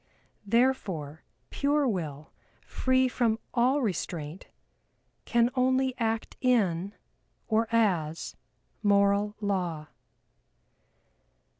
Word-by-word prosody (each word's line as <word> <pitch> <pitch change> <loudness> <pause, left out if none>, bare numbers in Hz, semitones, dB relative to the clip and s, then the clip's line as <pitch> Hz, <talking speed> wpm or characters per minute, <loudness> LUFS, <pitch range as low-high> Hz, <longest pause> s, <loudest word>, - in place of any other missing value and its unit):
Therefore, 195 - 0 0.3
pare 285 0 +1
Will, 155 - -4 0.3
free 260 0 +2
from 235 -3 +1 0.2
all 260 +3 +2
restraint 170 -5 -4 0.8
can 235 0 +2
only 260 0 +2
act 225 -1 -2
in, 200 -6 +1 0.5
or 225 0 +2
as, 175 -9 0 0.5
Moral 200 0 +3
Law. 175 -7 -2
215 Hz, 80 wpm, -28 LUFS, 175-250 Hz, 0.8 s, Moral